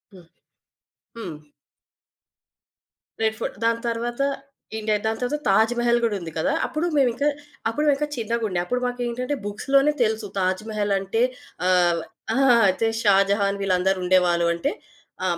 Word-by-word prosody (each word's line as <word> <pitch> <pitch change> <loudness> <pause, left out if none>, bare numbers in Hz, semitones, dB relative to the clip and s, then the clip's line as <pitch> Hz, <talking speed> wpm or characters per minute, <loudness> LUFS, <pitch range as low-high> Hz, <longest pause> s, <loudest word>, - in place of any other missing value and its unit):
హ్మ్. 175 -3 -15 0.9
హ్మ్. 180 -9 -6 1.9
Red 220 0 +1
fort. - - -4
దాని 230 0 +1
తర్వాతా 240 +4 -1 0.5
ఇండియా, 215 0 0
దాని 220 0 -1
తరవాత 250 +5 -1
తాజ్ 220 +4 +4
మహల్ 240 0 +3
గూడుంది 195 -8 -1
కదా! 280 - +1
అప్పుడు 315 +2 -2
మేవింక, 265 0 +2 0.5
అప్పుడు 300 +7 -1
మేవింక 290 +1 +2
చిన్నగుండే. 220 -5 -1
అప్పుడు 250 +5 -1
మాకేంటంటే, 245 +2 -2
బుక్స్‌లోనే 275 +8 +2
తెలుసు, 220 -1 -1
తాజ్ 185 +1 0
మహలంటే 205 0 0 0.5
ఆహ్ 175 -2 +3 0.3
ఆ! - - 0 0.4
జస్ట్ 225 0 0
షాజహాన్ 200 0 +3
వీళ్ళందరూ 190 0 +1
ఉండేవాళ్ళు 180 -2 +3
అంటే. 170 - -1 0.5
ఆహ్, 175 -2 0
220 Hz, 125 wpm, -23 LUFS, 190-240 Hz, 1.9 s, తాజ్